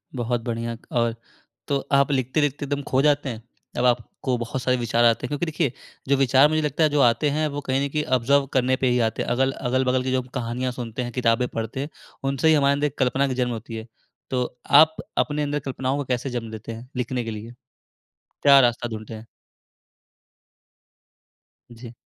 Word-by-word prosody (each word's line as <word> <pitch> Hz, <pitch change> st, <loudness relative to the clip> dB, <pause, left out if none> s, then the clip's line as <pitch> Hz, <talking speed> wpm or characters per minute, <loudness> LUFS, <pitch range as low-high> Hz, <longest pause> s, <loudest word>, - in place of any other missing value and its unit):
बहुत 120 Hz, -1 st, -1 dB
बढ़िया, 115 Hz, 0 st, -3 dB
और 115 Hz, -1 st, +1 dB, 0.5 s
तो 140 Hz, -1 st, +1 dB
आप 140 Hz, +1 st, +4 dB
लिखते-लिखते 140 Hz, +2 st, 0 dB
एकदम 145 Hz, 0 st, -2 dB
खो 130 Hz, 0 st, +1 dB
जाते 145 Hz, -1 st, +2 dB
हैं? 115 Hz, -2 st, -7 dB, 0.3 s
जब -, -, -2 dB
अब -, -, +3 dB
आपको 125 Hz, +1 st, 0 dB
बहुत 120 Hz, +2 st, -4 dB
सारे 125 Hz, 0 st, +1 dB
विचार 120 Hz, 0 st, +1 dB
आते 115 Hz, +1 st, +3 dB
हैं -, -, -5 dB
क्योंकि 145 Hz, +3 st, -1 dB
देखिए 160 Hz, -4 st, -1 dB, 0.4 s
जो 140 Hz, -, +4 dB
विचार 135 Hz, +1 st, +5 dB
मुझे 155 Hz, 0 st, +1 dB
लगता 150 Hz, +1 st, 0 dB
है 155 Hz, -, +4 dB
जो 145 Hz, -1 st, +2 dB
आते 125 Hz, +4 st, +3 dB
हैं 155 Hz, +2 st, 0 dB
वो 145 Hz, -1 st, -4 dB
कहीं 135 Hz, 0 st, 0 dB
न -, -, -3 dB
कहीं 150 Hz, +2 st, -1 dB
ऑब्ज़र्व 140 Hz, +4 st, +2 dB
करने 130 Hz, 0 st, +2 dB
पे 130 Hz, -, 0 dB
ही 125 Hz, 0 st, +2 dB
आते 110 Hz, -, -3 dB
हैं। -, -, -5 dB
अगल 130 Hz, +2 st, +2 dB
अगल-बगल 130 Hz, 0 st, 0 dB
की 130 Hz, -, -2 dB
जो 130 Hz, 0 st, +1 dB
कहानियाँ 125 Hz, +1 st, -2 dB
सुनते 120 Hz, -1 st, -5 dB
हैं 120 Hz, -, -5 dB
किताबें 120 Hz, 0 st, +1 dB
पढ़ते 115 Hz, +6 st, -4 dB, 0.4 s
उनसे 135 Hz, +2 st, +1 dB
ही 160 Hz, -, +6 dB
हमारे 140 Hz, -2 st, +4 dB
अंदर 145 Hz, +1 st, 0 dB
एक 145 Hz, -, -9 dB
कल्पना 130 Hz, +1 st, +2 dB
का 130 Hz, -, -2 dB
जन्म 125 Hz, -1 st, 0 dB
होती 115 Hz, 0 st, -6 dB
है। 110 Hz, +1 st, -7 dB, 0.4 s
तो 125 Hz, -1 st, 0 dB, 0.4 s
आप 160 Hz, 0 st, +4 dB, 0.2 s
अपने 150 Hz, 0 st, +1 dB
अंदर 145 Hz, 0 st, -1 dB
कल्पनाओं 130 Hz, 0 st, -2 dB
को 145 Hz, -, -2 dB
कैसे 125 Hz, +1 st, -2 dB
जन्म 120 Hz, -3 st, -4 dB
देते 110 Hz, +1 st, -7 dB
हैं? 115 Hz, +2 st, -9 dB
लिखने 125 Hz, 0 st, -2 dB
के 115 Hz, -, -5 dB
लिए, 110 Hz, +2 st, -7 dB, 0.9 s
क्या 140 Hz, -1 st, +8 dB
रास्ता 120 Hz, -1 st, +1 dB
ढूँढते 110 Hz, -1 st, -7 dB
हैं? 110 Hz, +1 st, -10 dB, 2.5 s
जी। 120 Hz, 0 st, -11 dB
130 Hz, 205 wpm, -24 LUFS, 120-140 Hz, 2.5 s, क्या